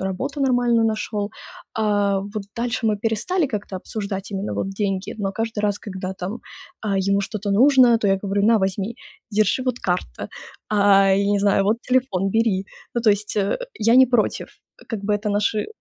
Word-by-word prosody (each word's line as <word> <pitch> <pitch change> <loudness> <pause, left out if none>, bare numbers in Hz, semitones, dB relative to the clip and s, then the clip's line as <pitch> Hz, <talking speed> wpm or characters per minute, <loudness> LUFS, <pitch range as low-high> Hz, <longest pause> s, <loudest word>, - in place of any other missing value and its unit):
работу 260 +10 -3
нормально 245 -3 +3
нашел, 215 -1 -2 0.4
а, 205 -2 +1
вот 205 +1 -5
дальше 235 0 -1
мы 210 -1 +2
перестали 255 - 0
как-то 205 -5 -5
обсуждать 200 0 -5
именно 195 +1 -3
вот 195 - -2
деньги, 195 -1 -2
но 195 -1 -1
каждый 225 -1 -3
раз, 205 -1 0
когда 190 -2 -6
там, 195 +6 -5 0.4
а, 200 -3 -1
ему 200 0 +3
что-то 205 0 -4
нужно, 250 0 +6
то 205 - 0
я 195 0 +3
говорю: 200 0 0
"На, 225 +2 +5
возьми, 195 +3 -2 0.4
держи, 215 +5 +2
вот 250 -1 -1
карта, 180 - -3 0.4
а, 200 -2 +5
я 200 +1 +2
не 200 - +2
знаю, 200 -1 +3
вот 225 +4 +1
телефон 245 -7 +1
бери". 220 -4 +1 0.3
Ну, 240 - +1
то 215 - +5
есть, 205 +1 -1
э, 200 -1 +1 0.2
я 230 +2 +2
не 260 0 +8
против, 240 -3 0 0.4
как 225 -4 -3
бы 210 - 0
это 210 +1 -2
наши 210 +1 0
210 Hz, 180 wpm, -22 LUFS, 195-230 Hz, 0.4 s, не